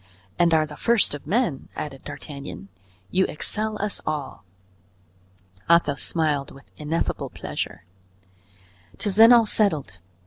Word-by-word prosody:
"And 170 -1 +4
are 155 -1 +4
the 150 -1 -10
first 235 -8 +3
of 145 -1 -8
men!" 200 - 0
added 135 -3 -6
D'Artagnan. 140 -7 -7 0.4
"You 190 0 +3
excel 215 +7 -3
us 210 0 -2
all." 150 -3 -4 1.3
Athos 170 -5 +3
smiled 150 -4 0
with 135 - -16
ineffable 155 +2 -2
pleasure. - - -6 1.1
"'Tis 200 - -1
then 225 +3 +8
all 235 -2 +7
settled. 155 - +1
155 Hz, 125 wpm, -24 LUFS, 145-210 Hz, 1.3 s, then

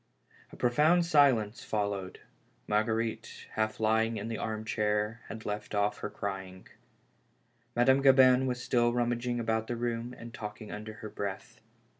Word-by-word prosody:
A - - -11
profound 155 +8 +3
silence 130 -9 +3
followed. 100 -3 -3 0.5
Marguerite, 110 +1 -1
half 110 0 -1
lying 110 +1 +2
in 115 - -4
the 115 - -3
arm 110 0 -3
chair, 105 +1 -1
had 110 -1 -8
left 105 0 -4
off 105 0 0
crying. 95 -3 -5 1.1
Madame 130 +3 +4
Gabin 130 -1 +6
was 125 -1 -2
still 120 -1 +2
rummaging 120 0 0
about 110 -1 -1
the 120 - -2
room, 120 +1 -3
and 115 0 -10
talking 105 0 -7
under 105 +1 -6
her - - -5
breath. 100 -2 -6
110 Hz, 140 wpm, -30 LUFS, 105-120 Hz, 1.1 s, Gabin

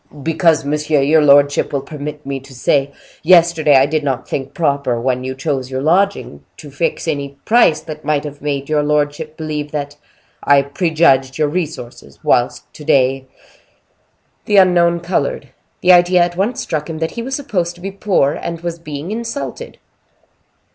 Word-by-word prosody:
"Because, 165 -1 +2
monsieur, 150 0 0
your 155 +3 +4
lordship 145 0 +4
will 140 -2 -2
permit 150 0 -7
me 135 0 -4
to 135 0 -15
say, 135 +2 +1 0.3
yesterday 165 -3 +4
I 135 0 +6
did 155 +1 -1
not 135 -3 -2
think 135 0 -4
proper, 140 -6 0
when 125 +1 -1
you 130 0 -4
chose 135 -2 -3
your 130 0 -3
lodging, 175 - 0
to 145 -2 -11
fix 165 +4 -2
any 140 -3 -3
price 215 -10 +4
that 155 -1 -9
might 150 -2 0
have 145 -1 -8
made 140 -2 -3
your 155 -1 +1
lordship 150 +1 -1
believe 150 -2 -4
that 145 -1 -4 0.5
I 140 -1 +4
prejudged 140 -4 +1
your 155 -1 +1
resources; 155 -7 -6
whilst - - +1
to 150 - -11
day—" 135 -1 +1 1.2
The 205 - +2
unknown 175 -2 +4
colored; 160 -6 -2 0.3
the 180 - +5
idea 175 0 +5
at 175 0 -2
once 205 +7 -1
struck 155 0 -4
him 160 - -5
that 160 0 -2
he 235 - -6
was 265 +3 -4
supposed 180 -12 -2
to 175 - -16
be 195 +2 -5
poor, 195 -8 +1
and 165 0 -6
was 170 -1 -5
being 155 +2 -7
insulted. 230 +4 -5
150 Hz, 170 wpm, -17 LUFS, 140-170 Hz, 1.2 s, I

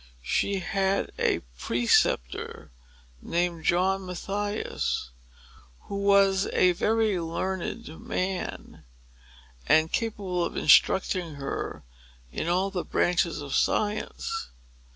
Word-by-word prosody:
She 200 - 0
had 195 +2 0
a - - +2 0.2
preceptor, 115 - +1 0.5
named 170 -1 -1
John 190 +2 +2
Mathias, 200 - -3 0.7
who 200 - -6
was 200 -1 +4
a 180 - +4
very 215 +1 +1
learned 185 +6 -3
man, 185 0 -4 0.8
and 160 +1 +4
capable 200 -6 -1
of - - -3
instructing 180 -4 +4
her 140 -1 -5 0.5
in - - -3
all 185 +3 +1
the 180 -3 -2
branches 175 -3 +1
of 140 -1 -6
science. 210 - -1
185 Hz, 95 wpm, -27 LUFS, 170-200 Hz, 0.8 s, was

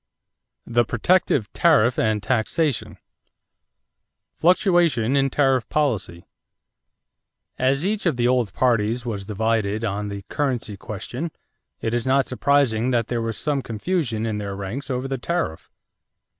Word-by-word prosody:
THE 120 0 +2
PROTECTIVE 120 - +1
TARIFF 125 -8 +4
AND 110 -2 +1
TAXATION 130 - 0 1.4
=Fluctuation 170 - +3
in 135 0 +3
Tariff 135 -3 +1
Policy.= 110 - -1 1.3
As 135 +5 +1
each 210 -1 0
of 160 - +2
the 120 0 +1
old 125 -5 +1
parties 115 0 +1
was 105 -4 -4
divided 110 0 0
on 105 -1 -2
the 100 -1 -6
currency 125 -7 -2
question, 110 - -5 0.5
it 115 - -2
is 120 +1 -1
not 135 +1 +3
surprising 130 -3 +2
that 120 -3 0
there 120 -1 -1
was 115 -1 -3
some 145 -2 0
confusion 115 - -2
in 110 -2 -2
their 100 -1 -4
ranks 100 +9 -5
over 130 0 -2
the 135 -1 -3
tariff. 150 - -3
120 Hz, 130 wpm, -23 LUFS, 110-140 Hz, 1.4 s, TARIFF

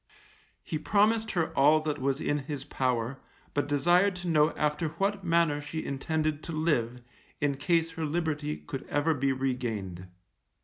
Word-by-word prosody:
He 155 - -3
promised 215 +6 +2
her 160 -2 0
all 150 +3 +6
that 155 -1 -2
was 135 +1 0
in 145 -1 0
his 140 -1 -5
power, 130 -2 -1 0.3
but 145 - 0
desired 175 +7 +3
to 180 0 -6
know 155 -2 +4
after 150 +2 0
what 195 +5 -1
manner 165 -4 +2
she 160 +2 -5
intended 155 +2 -1
to - - -5
live, 125 -7 0 0.4
in 140 -2 0
case 165 +2 +1
her 160 0 -3
liberty 150 -1 -1
could 135 - -6
ever 145 +3 +1
be 135 -1 +1
regained. 115 -9 -3
150 Hz, 160 wpm, -29 LUFS, 135-165 Hz, 0.4 s, all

